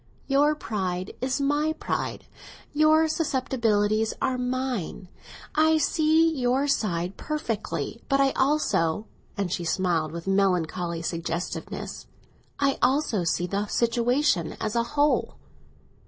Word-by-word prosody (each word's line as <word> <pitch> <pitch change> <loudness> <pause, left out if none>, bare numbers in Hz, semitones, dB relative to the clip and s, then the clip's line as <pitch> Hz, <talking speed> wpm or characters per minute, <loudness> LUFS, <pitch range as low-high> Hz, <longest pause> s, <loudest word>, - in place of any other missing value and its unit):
"Your 290 +2 +3
pride 185 -8 -3
is 260 +2 0
my 290 +3 +1
pride, 315 - -3 0.5
and 300 - -1
your 315 +1 +5
susceptibilities 230 -8 +1
are 260 - 0
mine. 250 -8 -3 0.4
I 315 +1 +4
see 315 +2 +3
your 260 +2 +1
side 185 -8 -1
perfectly, 230 -6 -3
but 275 - +3
I 275 -1 +4
also"—and 210 - -1
she 175 - -2
smiled 170 -2 0
with 170 0 -7
melancholy 180 -3 0
suggestiveness—"I 175 - -4
also 250 -6 +2
see 170 +1 0
the 200 +3 -2
situation 235 - +1
as 215 0 -2
a 235 - +3 0.2
whole!" 285 -4 +2
235 Hz, 110 wpm, -26 LUFS, 185-285 Hz, 0.5 s, your